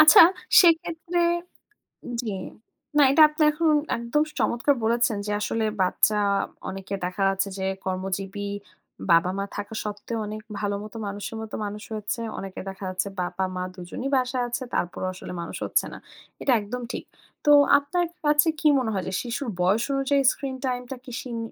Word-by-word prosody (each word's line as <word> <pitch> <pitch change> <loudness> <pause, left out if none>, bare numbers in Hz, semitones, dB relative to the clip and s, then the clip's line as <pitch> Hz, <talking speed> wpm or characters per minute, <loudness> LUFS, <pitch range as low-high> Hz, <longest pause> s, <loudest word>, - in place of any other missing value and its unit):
আচ্ছা। 310 - +10 0.4
সেক্ষেত্রে 335 0 +2 1.0
জি। 225 -4 -3 0.7
না, - - +7
এটা 315 - +5
আপনি 305 +1 0
এখন 315 +1 +2 0.3
একদম 235 +6 +1 0.2
চমৎকার 265 +4 +2
বলেছেন 230 -1 +2
যে 210 - -2
আসলে 225 +1 0 0.2
বাচ্চা, 185 +3 +3 0.5
অনেকে 195 +1 -6
দেখা 180 +2 -4
যাচ্ছে 195 +1 0
যে 190 - -3 0.2
কর্মজীবী, 195 +2 -3 0.6
বাবা-মা 185 +4 +3
থাকা 205 +1 -5
সত্ত্বেও 210 +2 -4
অনেক 215 +1 -6 0.2
ভালো 205 -1 -1
মত 215 - -10
মানুষের 205 +2 -5
মত 220 -1 -8
মানুষ 210 +1 -6
হচ্ছে। 210 +2 -3 0.2
অনেকে 195 -1 -6
দেখা 190 +1 -9
যাচ্ছে 185 +1 -2
বাবা-মা 185 +1 -2
দু 185 - -14
জনই 265 +7 -3
বাসায় 255 -1 +1
আছে। 240 +2 -3
তারপরেও 180 +1 -1
আসলে 185 - -8
মানুষ 170 - -6
হচ্ছে - - +1
না, - - -7 0.4
এটা 275 - +2
একদম 245 +5 -5
ঠিক। - - -5 0.4
তো 295 - +6 0.3
আপনার 320 +5 0 0.2
কাছে 295 +2 +5
কি 310 - +3
মনে 250 -4 -1
হয় 190 -2 -1
যে, - - -4
শিশুর 240 +1 -3
বয়স 195 +6 +3
অনুযায়ী 275 +1 +2
স্ক্রিন 270 -2 -5
টাইম 250 -1 -1
টা 265 - -2
কি 255 - -10
সিন 240 -3 -6
220 Hz, 165 wpm, -25 LUFS, 195-265 Hz, 1.0 s, আচ্ছা